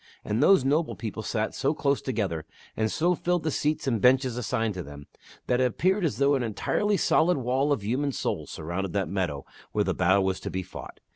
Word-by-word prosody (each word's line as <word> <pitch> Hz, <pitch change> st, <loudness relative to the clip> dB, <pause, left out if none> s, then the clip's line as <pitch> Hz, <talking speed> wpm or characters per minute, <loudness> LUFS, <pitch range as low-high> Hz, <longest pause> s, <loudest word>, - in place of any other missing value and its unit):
And 110 Hz, +4 st, 0 dB
those 155 Hz, -3 st, +5 dB
noble 155 Hz, +4 st, +1 dB
people 110 Hz, -1 st, -5 dB
sat 110 Hz, 0 st, -2 dB
so 140 Hz, +3 st, 0 dB
close 140 Hz, -2 st, +1 dB
together, 95 Hz, -, -2 dB, 0.3 s
and 110 Hz, -1 st, 0 dB
so 175 Hz, +3 st, +2 dB
filled 175 Hz, -1 st, -1 dB
the 155 Hz, -, 0 dB
seats 150 Hz, +2 st, -1 dB
and 115 Hz, -6 st, 0 dB
benches 130 Hz, -1 st, +4 dB
assigned 115 Hz, -2 st, -1 dB
to 90 Hz, -, -5 dB
them, 70 Hz, -2 st, -10 dB, 0.4 s
that 125 Hz, 0 st, +1 dB
it -, -, +4 dB
appeared 185 Hz, -, +1 dB
as 165 Hz, -, 0 dB
though 140 Hz, +1 st, +3 dB
an 135 Hz, -, +1 dB
entirely 195 Hz, -, 0 dB
solid 180 Hz, -1 st, +3 dB
wall 130 Hz, +3 st, 0 dB
of 135 Hz, -8 st, 0 dB
human 135 Hz, +7 st, 0 dB
souls -, -, -3 dB
surrounded 85 Hz, +3 st, -4 dB
that 95 Hz, -5 st, -1 dB
meadow 90 Hz, -7 st, -2 dB, 0.3 s
where -, -, +2 dB
the -, -, 0 dB
battle 95 Hz, +2 st, +3 dB
was 95 Hz, 0 st, -1 dB
to -, -, -5 dB
be 95 Hz, 0 st, -3 dB
fought. 90 Hz, -, -10 dB
125 Hz, 215 wpm, -27 LUFS, 95-145 Hz, 0.4 s, those